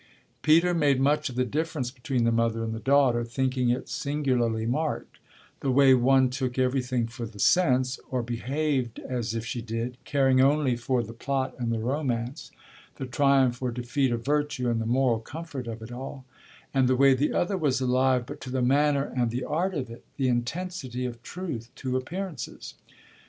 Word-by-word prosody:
Peter 165 +3 +4
made 145 -5 +3
much 145 +2 +2
of 125 - -8
the 125 0 +1
difference 150 -3 -2
between 125 -1 -2
the 115 - +3
mother 115 -1 +1
and 110 0 -3
the 110 - -5
daughter, 135 -3 +3
thinking 125 +1 0
it 125 +2 -1
singularly 125 -6 0
marked 150 +6 -2 0.4
the 135 - -2
way 135 0 +6
one 130 +1 +4
took 125 0 -3
everything 125 -2 +1
for 115 0 -6
the 105 -1 -14
sense, 130 - +3
or 125 -2 -1
behaved 125 +1 -1
as 120 -4 -3
if 115 0 -3
she 120 0 -3
did, 115 +2 -4
caring 135 -2 +3
only 140 -2 +3
for 120 +1 0
the 115 +1 -8
plot 135 +3 -2
and 120 -1 -1
the 115 - 0
romance, 125 +1 -2 0.5
the 135 - -5
triumph 130 -1 +2
or 125 - 0
defeat 125 +2 -1
of 115 0 -3
virtue 145 -4 0
and 115 -1 0
the 110 - -2
moral 125 -1 +2
comfort 145 0 -7
of 115 -1 -6
it 110 - -9
all, 130 +1 -7 0.5
and 130 -2 +3
the 130 - +3
way 135 +1 +6
the 135 +3 +1
other 185 +3 0
was 145 -8 +1
alive 130 -1 +2
but 145 +3 -9
to 130 - -7
the 130 +1 -1
manner 140 +2 +2
and 120 -2 +1
the 125 +3 -3
art 180 +5 -1
of 135 -4 -2
it, 115 - -11
the 135 - +1
intensity 125 +1 -2
of 120 -2 -6
truth 130 -7 -6
to 130 -1 -3
appearances. 160 +2 -5
130 Hz, 190 wpm, -27 LUFS, 120-140 Hz, 0.5 s, way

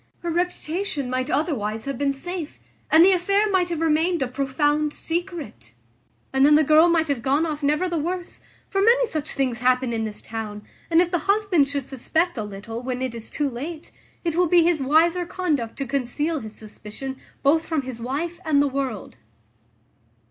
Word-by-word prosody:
Her 345 - -2
reputation 340 -4 -2
might 255 0 -1
otherwise 225 -8 -1
have 275 -3 -4
been 285 -1 +2
safe, 325 +3 -6 0.3
and 320 +2 +7
the 390 - +6
affair 395 +3 +2
might 365 -2 +2
have 335 -2 -3
remained 325 0 +2
a - - -1
profound 290 +3 0
secret; 325 - -5 0.6
and 265 0 +3
then 295 +1 +7
the 310 - +5
girl 310 +4 +6
might 330 -1 +2
have 280 -5 -1
gone 280 +6 +2
off 305 -2 -3
never 300 +5 +1
the 340 -2 -1
worse; 350 +3 -4 0.3
for 390 - 0
many 480 +4 +5
such 310 -8 -3
things 255 -4 -1
happen 250 0 +2
in 225 -1 -1
this 215 -1 -5
town: 215 -2 -6 0.3
and 335 0 +5
if 350 -1 0
the 350 - +1
husband 400 -8 +3
should 280 -2 -3
suspect 320 +7 -1
a 220 - -3
little, 210 +3 -7
when 250 0 -3
it 255 -2 -2
is 230 -1 -8
too 295 - -1
late, 300 +6 -6 0.3
it 335 -2 0
will 355 +1 +3
be 345 +1 +5
his 335 -3 +2
wiser 325 +6 +3
conduct 310 -10 -2
to 275 - -2
conceal 280 +5 -1
his 220 -3 -9
suspicion 220 +5 -8 0.3
both 310 +4 +4
from 315 -4 -1
his 250 -3 -7
wife 315 +8 -3
and 310 -3 +2
the 285 - +4
world." 265 - -4
295 Hz, 190 wpm, -23 LUFS, 255-340 Hz, 0.6 s, and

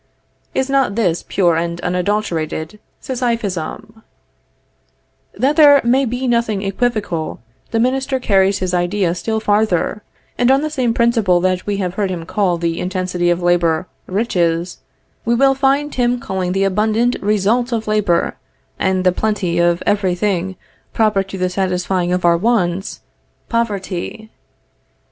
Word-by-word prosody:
Is 265 - +1
not 270 -7 +1
this 180 -7 +1
pure 175 -4 +2
and 170 +1 -2
unadulterated 180 -1 -2 0.2
Sisyphism? 225 - -3 1.3
That 270 +8 +1
there 290 -2 +8
may 255 +3 +3
be 250 +2 -2
nothing 230 -4 0
equivocal, 200 -5 -2 0.3
the 225 - 0
minister 265 +2 0
carries 195 -4 +2
his 185 -2 -3
idea 180 0 +1
still 220 +5 -2
farther, 210 -1 +1 0.4
and 245 0 +3
on 270 +1 +4
the 310 - -2
same 250 -6 0
principle 225 -7 +3
that 185 +1 0
we 205 -1 -1
have 180 -3 -2
heard 200 0 -1
him 170 -3 -4
call 185 -1 0
the 170 0 -2
intensity 180 -1 -1
of 175 0 0
labor 175 -1 +2 0.2
riches, 175 -4 -1 0.4
we 235 +1 +1
will 270 +2 +4
find 275 +2 +1
him 245 -1 +1
calling 185 -4 -3
the 195 +1 +1
abundant 215 +5 +1
results 215 +5 +1
of 225 -2 -1
labor, 210 -5 +1 0.5
and 190 -1 +1
the 185 - +4
plenty 185 -4 -1
of 175 0 +2
every 195 -3 +1
thing 190 -1 -1 0.4
proper 215 -3 +2
to 195 0 -7
the 185 0 0
satisfying 180 -1 -1
of 180 0 0
our 170 0 +5
wants, 190 -3 0 0.5
poverty. 220 -1 -3
200 Hz, 145 wpm, -18 LUFS, 180-235 Hz, 1.3 s, there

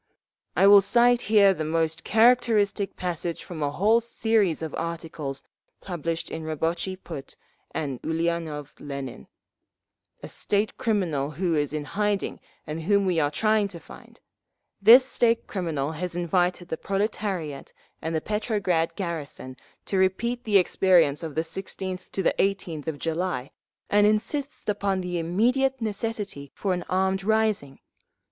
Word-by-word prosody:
"I - - +4
will 200 0 +9
cite 240 +4 +4
here 200 -3 +6
the 160 - -4
most 160 0 -1
characteristic 220 -3 +3
passage 175 -2 -3
from 165 -3 -7
a 145 - +1
whole 210 +10 +3
series 220 -7 +1
of 160 - -5
articles 165 -4 -5 0.4
published 165 -2 -4
in 160 - -5
Rabotchi 165 +4 -2
Put 160 -7 -9 0.4
by 140 -6 -3
Ulianov 160 -3 -2
Lenin, 140 - -7 1.0
a - - -5
state 205 +1 -1
criminal 170 -11 0
who 175 +2 -1
is 145 -2 0
in 150 -1 -3
hiding 205 +3 -1 0.3
and 155 +2 -5
whom 200 +4 +2
we 180 -3 +1
are 145 -2 +2
trying 215 +6 +2
to 180 -4 -9
find…. - - -15 0.6
This 240 +6 +9
state 235 -3 +1
criminal 160 -7 -2
has 170 +2 -4
invited 175 0 0
the 160 - -2
proletariat 195 -7 -3 0.3
and 160 0 -2
the 160 - 0
Petrograd 195 -6 0
garrison 155 -8 -5 0.3
to 195 - 0
repeat 235 +6 0
the 210 -2 +5
experience 175 -5 +3
of 160 -3 -6
the 160 - +2
16th 185 +2 -6
18th 190 -5 -1
of 160 -2 -2
July, 165 -4 -2 0.4
and 205 0 +4
insists 270 +7 -1
upon 200 -2 0
the 180 -1 -2
immediate 250 +11 +1
necessity 210 - -4
for 195 -2 -1
an 180 -1 -3
armed 190 +1 +1
rising…. 215 -9 0
180 Hz, 140 wpm, -26 LUFS, 160-205 Hz, 1.0 s, will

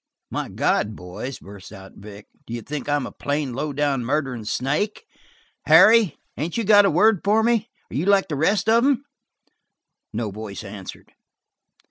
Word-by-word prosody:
"My - - -3
God, 105 +1 0
boys," 90 +10 -7
burst 100 -1 -13
out 95 -2 -12
Vic, 100 0 -12 0.2
"d'you 115 0 -6
think 150 0 -5
I'm 145 -2 0
a - - -7
plain, 145 -2 -3
low 145 +4 -3
down, 140 -2 0
murderin' 130 -3 -2
snake? 150 - -2 0.6
Harry, 220 -7 +6 0.2
ain't 165 +7 -4
you 230 - 0
got 205 -1 +6
a - - +4
word 200 +4 +3
for 215 +2 +3
me? 230 -1 +1 0.2
Are - - -7
you 160 +7 -1
like 200 -1 +4
the 150 - -3
rest 200 +8 +1
of 230 +2 +4
'em?" 280 0 +1 1.1
No 110 -1 -3
voice 105 0 -7
answered. 100 -2 -10
145 Hz, 165 wpm, -22 LUFS, -, 1.1 s, Harry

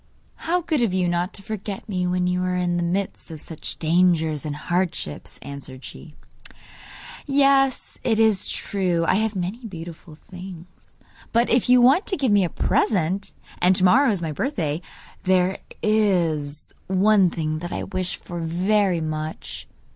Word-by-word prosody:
'How 355 +2 -1
good 315 -5 0
of 210 -6 +1
you 180 -1 +1
not 175 +2 0
to 200 - -10
forget 205 -2 -5
me 180 -4 -1
when 180 0 0
you 180 0 0
are 180 0 0
in 175 -1 0
the - - 0
midst 185 +3 -2
of 160 -2 -8
such 160 +1 -6
dangers 160 -2 +2
and 145 - -3
hardships,' 175 - -3
answered 135 -2 -9
she. 155 - -11 1.1
'Yes, 275 -1 +2
it 225 -2 +2
is 220 -3 +3
true 180 -4 0
I - - +3
have 220 -1 -1
many 190 +7 -3
beautiful 165 -3 -9
things; 180 +1 -12 0.3
but 235 +1 +2
if 245 +1 +3
you 250 -1 +7
want 270 - +5
to 380 - 0
give 265 -6 +1
me 205 -1 +5
a 175 - 0
present 195 -1 0 0.3
and 185 +1 +5
to 185 - +1
morrow 255 +9 +5
is 195 -6 0
my 160 - -2
birthday 160 - -2 0.4
there 185 0 +2 0.2
IS 170 -9 +1
one 190 0 +4
thing 155 -2 -2
that 175 +1 -6
I - - -3
wish 185 -2 -2
for 175 -1 -8
very 180 +2 +1
much. 155 0 -5
180 Hz, 165 wpm, -23 LUFS, 165-215 Hz, 1.1 s, you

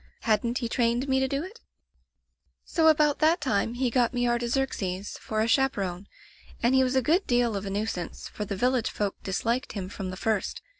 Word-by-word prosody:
Hadn't 230 +2 +1
he 240 - -2
trained 240 +2 +1
me 265 0 +2
to 265 - +1
do 275 +3 -2
it? 410 +6 -10 1.1
"So 320 -1 +2
about 300 -2 +4
that 320 +3 +4
time 230 -4 0
he 250 -1 0
got 245 0 +2
me 245 0 +1
Artaxerxes 235 -6 -1
for 215 0 -2
a 220 - +1
chaperone, 200 -8 0 0.6
and 240 +2 +4
he 265 0 +5
was 255 0 0
a 260 - +3
good 340 - +2
deal 240 -3 +2
of 200 0 -4
a - - -2
nuisance, 200 -3 -3
for 210 - -5
the 200 -1 -4
village 250 +3 +1
folk 205 -2 -2
disliked 235 +7 -1
him 190 -3 -5
from 195 -1 -5
the 185 - -6
first. 215 -1 -1
240 Hz, 200 wpm, -27 LUFS, 205-265 Hz, 1.1 s, he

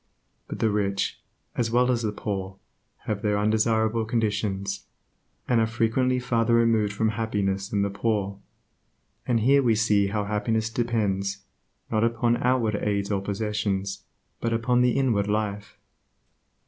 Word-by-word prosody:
But - - -6
the 110 - +1
rich, 100 -1 -1 0.4
as 115 -2 0
well 125 +2 +3
as 120 -2 0
the 110 -2 -1
poor, 95 -2 -4 0.5
have 105 -2 -2
their 105 -1 +1
undesirable 110 +1 +2
conditions, 100 -3 -2 0.6
and 120 -2 +3
are 110 - +2
frequently 120 +3 +1
farther 115 -2 +1
removed 115 -3 +3
from 110 +2 0
happiness 100 -3 -1
than 100 -2 +1
the 100 - -1
poor. 100 -2 -1 0.9
And 115 -2 +2
here 140 +5 +5
we 120 -4 +3
see 105 -2 +3
how 105 +1 -1
happiness 110 +2 -1
depends, 100 -5 -1 0.5
not 110 -1 +2
upon 115 +1 +2
outward 120 -4 +1
aids 100 -1 -1
or 100 -1 0
possessions, 100 -1 -2 0.4
but 115 - -1
upon 120 +2 +2
the 125 -1 +3
inward 115 -7 +1
life. 105 -1 -2
110 Hz, 145 wpm, -26 LUFS, 100-115 Hz, 0.9 s, here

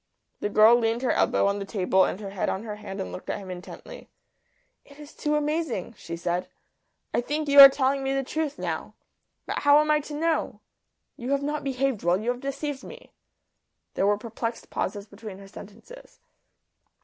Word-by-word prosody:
The 205 - -2
girl 215 +3 +7
leaned 230 +1 0
her 255 - +2
elbow - - +2
on 200 0 +1
the - - -3
table 190 -1 +2
and 185 - -3
her 200 -2 -7
head 195 - -2
on 190 - -3
her 210 -2 -6
hand 200 -1 -8
and 190 - -4
looked - - -9
at - - -1
him 195 -2 -8
intently. 180 0 -10 0.7
"It 280 - -18
is 295 0 -12
too 300 0 -1
amazing," 300 - -2
she 170 -3 -7
said. 175 +1 -2 0.6
"I - - +2
think 300 +4 -3
you 285 0 +6
are 275 0 +14
telling 270 0 0
me 270 - -1
the 270 0 0
truth 300 +1 -3
now. - - -4 0.5
But - - -3
how 285 0 +6
am 305 0 +2
I 300 - +4
to 295 0 -7
know? 325 +1 -1 0.6
You 245 +1 -6
have 280 0 +1
not 295 +1 -2
behaved 270 -4 -1
well. 175 +2 +2
You 230 +3 0
have 245 0 -6
deceived 275 0 -4
me." - - -12 0.8
There 195 - +1
were 205 0 +3
perplexed 230 +1 -5
pauses 205 -1 -3
between 205 -1 -10
her 195 0 -12
sentences. 480 - -13
240 Hz, 195 wpm, -26 LUFS, 200-285 Hz, 0.8 s, are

